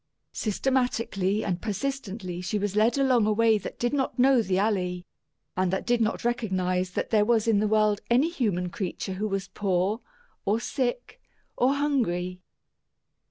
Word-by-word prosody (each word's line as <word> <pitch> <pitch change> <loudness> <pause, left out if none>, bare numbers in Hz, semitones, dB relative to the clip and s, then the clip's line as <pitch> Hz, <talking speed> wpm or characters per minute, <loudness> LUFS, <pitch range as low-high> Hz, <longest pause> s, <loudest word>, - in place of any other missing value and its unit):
Systematically 220 -4 0
and 180 -2 -2
persistently 205 -5 -4
she 180 +4 -2
was 205 -1 -2
led 220 +5 +3
along 255 -5 +3
a - - +3
way 220 0 +3
that - - -7
did 240 +2 -1
not 270 -2 -1
know 260 -1 +5
the 190 -3 0
Alley, 185 -3 0 0.5
and 185 -1 +1
that 190 - -2
did 240 -1 +2
not 220 +1 -1
recognize 185 -6 0
that - - -3
there 215 -2 +4
was 225 0 +2
in 220 -3 +4
the 215 - +1
world 215 -1 +2
any 255 +7 +4
human 180 - -1
creature 190 -1 -4
who 205 +3 -2
was 195 -2 -3
poor, 195 +3 0 0.4
or 210 +3 +1
sick, 275 - -3 0.3
or 260 +3 +2
hungry. 185 -11 -1
215 Hz, 160 wpm, -27 LUFS, 190-240 Hz, 0.5 s, know